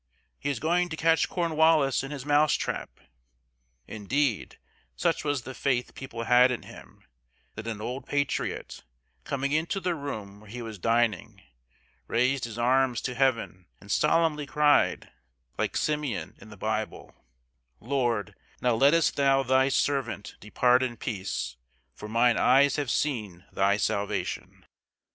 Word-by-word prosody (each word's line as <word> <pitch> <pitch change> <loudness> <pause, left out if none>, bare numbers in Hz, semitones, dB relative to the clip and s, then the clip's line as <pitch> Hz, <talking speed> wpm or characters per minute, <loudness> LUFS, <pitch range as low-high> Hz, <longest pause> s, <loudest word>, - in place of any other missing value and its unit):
He 140 - -2
is 140 -4 -2
going 175 +4 +1
to 160 - -5
catch 165 0 +2
Cornwallis 160 -5 +2
in 135 - -6
his 140 -3 -6
mouse 150 +1 +4
trap!" - - -4 0.9
Indeed, 115 +3 -2 0.4
such - - 0
was 145 -4 -1
the 130 - -7
faith 125 -2 -1
people 115 -3 -7
had 125 +2 +5
in 125 - -3
him - - -14 0.5
that 110 - -8
an 110 -2 -4
old 125 +4 -5
patriot, 140 -1 -2 0.4
coming 140 0 -2
into 160 +6 0
the 180 -1 -1
room 110 -10 -6
where 105 0 -16
he 120 +2 -6
was 110 -3 -8
dining, 115 -1 0 0.6
raised 125 +2 +1
his 115 -1 -8
arms 125 0 +2
to 125 - -3
heaven 115 -9 0
and 100 - -10
solemnly 150 0 +2
cried, 150 0 +2 0.5
like - - -1
Simeon 150 -7 -2
in 110 - -13
the 105 - -12
Bible: 110 +2 -3 0.7
"Lord, 120 -5 -1 0.3
now 125 -1 +2
lettest 140 +8 +3
thou 135 -1 +3
thy 130 +1 +3
servant 130 -7 -1
depart 125 +4 +2
in 125 -2 -2
peace, 95 - -4 0.4
for 105 +10 -9
mine 115 +1 +3
eyes 140 +1 +4
have 145 -3 -2
seen 105 -12 -2
thy 100 +1 +2
salvation." 105 -1 -3
130 Hz, 145 wpm, -27 LUFS, 110-145 Hz, 0.9 s, had